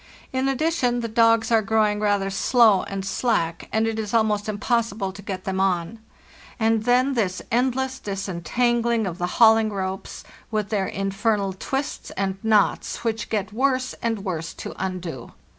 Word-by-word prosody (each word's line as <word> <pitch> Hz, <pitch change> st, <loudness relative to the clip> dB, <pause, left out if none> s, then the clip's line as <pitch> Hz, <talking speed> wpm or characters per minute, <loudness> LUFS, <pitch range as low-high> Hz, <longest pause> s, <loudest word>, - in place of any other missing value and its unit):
In 260 Hz, +1 st, 0 dB
addition, 270 Hz, -4 st, +1 dB
the 230 Hz, -, -2 dB
dogs 230 Hz, 0 st, +3 dB
are 225 Hz, -1 st, +5 dB
growing 215 Hz, -1 st, +1 dB
rather 205 Hz, -2 st, +1 dB
slow 215 Hz, -1 st, +4 dB
and 195 Hz, -1 st, -5 dB
slack, 175 Hz, -6 st, -1 dB
and 220 Hz, 0 st, +2 dB
it 225 Hz, 0 st, -2 dB
is 215 Hz, +1 st, -3 dB
almost 215 Hz, -2 st, +1 dB
impossible 215 Hz, -2 st, -1 dB
to 195 Hz, +1 st, -11 dB
get 190 Hz, -2 st, -5 dB
them 190 Hz, -1 st, -2 dB
on. 190 Hz, +3 st, 0 dB, 0.6 s
And 225 Hz, -1 st, +2 dB
then 250 Hz, +3 st, +3 dB
this 195 Hz, -7 st, 0 dB
endless 260 Hz, +2 st, 0 dB
disentangling 220 Hz, +5 st, 0 dB
of 175 Hz, -2 st, -5 dB
the 175 Hz, -, 0 dB
hauling 225 Hz, -1 st, +6 dB
ropes, 190 Hz, -1 st, -5 dB, 0.3 s
with 215 Hz, -2 st, -2 dB
their 200 Hz, -3 st, 0 dB
infernal 195 Hz, 0 st, -1 dB
twists 270 Hz, +9 st, -4 dB
and 195 Hz, 0 st, -1 dB
knots, 215 Hz, -2 st, +1 dB
which 225 Hz, -1 st, -2 dB
get 205 Hz, -2 st, -2 dB
worse 260 Hz, +1 st, +1 dB
and 225 Hz, -4 st, -2 dB
worse 165 Hz, -3 st, -4 dB
to -, -, -7 dB
undo! 175 Hz, -9 st, -5 dB
215 Hz, 160 wpm, -23 LUFS, 195-235 Hz, 0.6 s, hauling